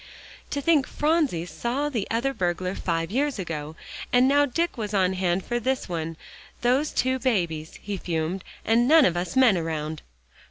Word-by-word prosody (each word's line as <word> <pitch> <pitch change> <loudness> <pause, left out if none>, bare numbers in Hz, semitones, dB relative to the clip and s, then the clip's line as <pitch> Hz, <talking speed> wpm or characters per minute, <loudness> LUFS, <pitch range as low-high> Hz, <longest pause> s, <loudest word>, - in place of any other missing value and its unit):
"To 285 - -2
think 300 -4 +3
Phronsie 295 - +1
saw 235 - -2
the 235 -9 -2
other 240 +4 0
burglar 180 -2 -1
five 165 -2 -2
years 280 +3 0
ago, 160 -4 -5 0.4
and 250 +1 +5
now 285 +1 +4
Dick 335 +6 -1
was 210 -4 -3
on 190 -1 +3
hand 185 0 0
for 240 0 -1
this 260 +3 -1
one 165 -2 -4 0.4
those 260 +5 +2
two 260 +1 0
babies," 170 - -1
he 205 -1 -3
fumed, 170 +1 -2 0.2
"and 235 +2 +3
none 315 +1 +7
of 175 - +2
us 175 0 -3
men 245 -8 +5
around." 155 -1 -3
205 Hz, 170 wpm, -25 LUFS, 170-260 Hz, 0.4 s, none